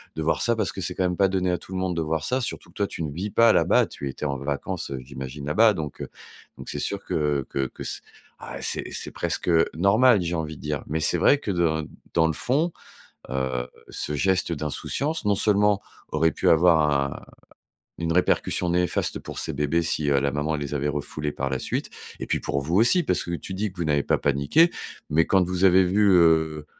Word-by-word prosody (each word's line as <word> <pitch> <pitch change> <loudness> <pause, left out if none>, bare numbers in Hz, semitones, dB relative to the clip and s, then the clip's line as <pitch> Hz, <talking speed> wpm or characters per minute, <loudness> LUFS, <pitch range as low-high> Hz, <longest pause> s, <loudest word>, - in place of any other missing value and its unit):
de 80 - -3
voir 80 - +1
ça, 120 -1 +2
parce 110 -6 -1
que 95 - -7
c'est 90 +1 -3
quand 95 - 0
même 90 -1 0
pas 95 - +4
donné 95 -1 0
à 90 - 0
tout - - -14
le - - -2
monde 95 -2 -1
de 85 - -1
voir 80 -1 -1
ça, 130 +1 0
surtout 120 - -5
que - - -20
toi, 100 -2 0
tu 85 - -5
ne 75 - -3
vis 95 +8 -4
pas 115 +1 +5
là-bas, - - +4
tu 70 - -6
étais 70 - -6
en 70 -2 -1
vacances, 70 +1 -4
heu, 70 - -3
j'imagine 65 +2 -7
là-bas 105 +8 +4
donc, 75 -5 -6
heu, - - -4 0.5
donc - - -8
c'est - - -4
sûr - - -3
que 75 -3 0
que 70 -1 -1
que - - -10
c - - -4 0.4
ah - - -8
c'est - - -2
c'est - - -5
presque, 90 - -2 0.2
normal, 110 +7 +4
j'ai 85 - -2
envie 80 -1 -3
de - - -14
dire. 75 -1 -2
Mais 80 +2 -2
c'est - - +1
vrai 145 - +5
que 105 - -4
dans 80 -3 +1 0.3
dans 80 - +4
le 80 - +1
fond, 150 - 0 0.6
heu, 65 -1 -2 0.2
ce 75 - -2
geste 90 +2 +1
d'insouciance, 110 - -3
non 100 -1 +3
seulement, 105 0 +2 0.3
aurait 80 -1 +3
pu - - -2
avoir 80 -2 +5
un 70 -1 0 0.8
une 85 0 0
répercussion 90 0 +1
néfaste 90 0 0
pour - - -7
ces - - -2
bébés 75 +4 0
si, 75 -2 -1
heu, 70 -1 +3
la 70 -1 0
maman 75 +2 -1
les 75 -1 -4
avait 75 0 -1
refoulés 75 +1 -3
par 70 -1 -3
la 65 - -2
suite, - - -3 0.3
et - - -4
puis - - 0
pour 70 - -2
vous 80 +6 -2
aussi, 120 - +4
parce 90 - 0
que 85 - -5
tu 85 +2 -5
dis 100 0 -3
que 95 - -23
vous 85 - -1
n'avez 75 -2 +1
pas - - +1
paniqué. 70 - +3 0.4
Mais 80 +2 +3
quand 95 -2 +3
vous 90 +1 0
avez 95 0 +6
vu, 100 +3 +3
heu, 80 -3 +3
80 Hz, 235 wpm, -25 LUFS, 75-95 Hz, 0.8 s, avez